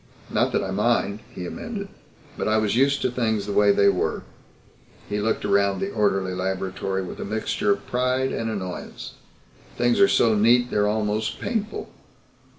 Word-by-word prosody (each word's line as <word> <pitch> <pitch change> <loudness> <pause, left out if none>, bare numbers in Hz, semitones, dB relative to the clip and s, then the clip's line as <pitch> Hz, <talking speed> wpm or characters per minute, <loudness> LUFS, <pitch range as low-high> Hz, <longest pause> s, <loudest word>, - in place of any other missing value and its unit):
Not - - +2
that - - +1
I 95 - -3
mind," 105 0 +1
he 90 - -6
amended, 200 - -5 0.5
"but - - -2
I 110 0 +3
was 110 0 +1
used 140 +3 +2
to 125 - +1
things 110 -4 0
the 105 - -4
way 105 0 +5
they 100 0 +4
were." 100 - +1 0.8
He 105 0 -2
looked 110 0 -1
around 100 -1 +2
the 195 +1 -2
orderly 95 - +1
laboratory 95 +1 -2
with 90 - -8
a - - -3
mixture 105 0 -1
of 100 0 -8
pride 130 +1 0
and 115 - -2
annoyance. 95 -4 -6 0.6
"Things 120 0 +2
are 200 - +7
so 115 - +3
neat 120 +4 +4
they're 105 0 +2
almost 105 0 -1
painful." 220 -2 -3
105 Hz, 170 wpm, -24 LUFS, 100-120 Hz, 0.8 s, are